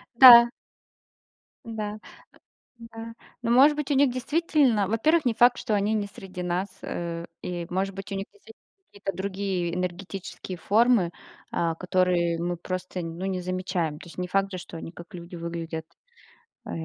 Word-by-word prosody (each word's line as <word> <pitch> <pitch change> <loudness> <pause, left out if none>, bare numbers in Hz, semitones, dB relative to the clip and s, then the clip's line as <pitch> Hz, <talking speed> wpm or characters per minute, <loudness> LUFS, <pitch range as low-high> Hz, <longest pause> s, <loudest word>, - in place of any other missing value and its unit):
Да. 235 -1 +11 1.2
Да, 215 -2 -4 0.9
э, 230 - -12
да. 225 0 -7 0.3
Ну, 230 -1 0
может 275 +5 +6
быть, 295 -1 -3
у - - +4
них 270 -1 +4
действительно, 260 - +2
во-первых, 295 +9 +2
не 240 - +2
факт, 245 +2 +5
что 220 -5 -1
они 205 +2 +1
не 205 -2 -1
среди 185 -2 -8
нас, 180 +3 -1
э, 170 -1 -4 0.2
и 175 -1 -4
может 190 +2 -1
быть, 195 +1 -8
у - - -2
них 195 0 -3
действительно 420 +2 -18 0.3
какие-то 195 -1 -5
другие 190 -3 -2
энергетические 180 0 -5
формы, 215 -3 +3 0.4
а, 165 -1 0
которые 180 -1 +1
мы 175 0 -2
просто, 185 +1 -5
н 165 0 -6
ну, 190 - -3
не 190 -1 -2
замечаем. 180 -4 -2
То - - -12
есть - - -13
не 180 0 -2
факт 195 +2 0
же, 185 - -4
что 175 - -9
они 165 - -7
как 170 0 -13
люди 175 0 -9
выглядят. 165 -1 -5 0.8
Э. - - -6
190 Hz, 170 wpm, -26 LUFS, 175-230 Hz, 1.2 s, Да